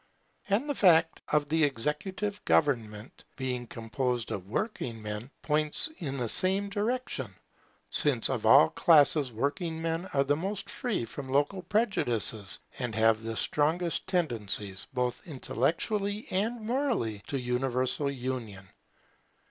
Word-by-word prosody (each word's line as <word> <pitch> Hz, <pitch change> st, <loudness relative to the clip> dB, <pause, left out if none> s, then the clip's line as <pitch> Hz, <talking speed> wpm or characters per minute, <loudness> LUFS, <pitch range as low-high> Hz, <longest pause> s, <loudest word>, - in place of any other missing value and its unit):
And 215 Hz, +9 st, +1 dB
the 290 Hz, -, 0 dB
fact 165 Hz, -8 st, +4 dB
of 150 Hz, -1 st, +2 dB
the 160 Hz, +2 st, +2 dB
executive 150 Hz, -, -2 dB
government 115 Hz, -6 st, 0 dB
being 125 Hz, -2 st, -3 dB
composed 120 Hz, +1 st, -3 dB
of 95 Hz, -2 st, -5 dB
working 120 Hz, -, -3 dB
men, 105 Hz, +3 st, -5 dB
points 150 Hz, -, +4 dB
in 140 Hz, -6 st, -3 dB
the 120 Hz, -2 st, -1 dB
same 190 Hz, -, +1 dB
direction; 230 Hz, +5 st, -2 dB, 0.6 s
since -, -, +3 dB
of -, -, -1 dB
all -, -, +7 dB
classes 150 Hz, -4 st, +4 dB
working 160 Hz, -, -2 dB
men 165 Hz, +2 st, -2 dB
are 140 Hz, -, +4 dB
the 145 Hz, +1 st, +1 dB
most 195 Hz, +4 st, -4 dB
free 240 Hz, -, -2 dB
from 130 Hz, +4 st, -8 dB
local 145 Hz, +8 st, +1 dB
prejudices, 120 Hz, -, +1 dB, 0.2 s
and 120 Hz, -4 st, -3 dB
have 110 Hz, 0 st, +3 dB
the 115 Hz, 0 st, -4 dB
strongest 165 Hz, +3 st, 0 dB
tendencies, 110 Hz, -, -1 dB
both 125 Hz, -2 st, -2 dB
intellectually 195 Hz, -, -1 dB
and 220 Hz, +5 st, -1 dB
morally, 225 Hz, -, -1 dB
to 140 Hz, -, -2 dB
universal 130 Hz, +2 st, -1 dB
union. 125 Hz, -7 st, -5 dB
145 Hz, 130 wpm, -29 LUFS, 120-185 Hz, 0.6 s, all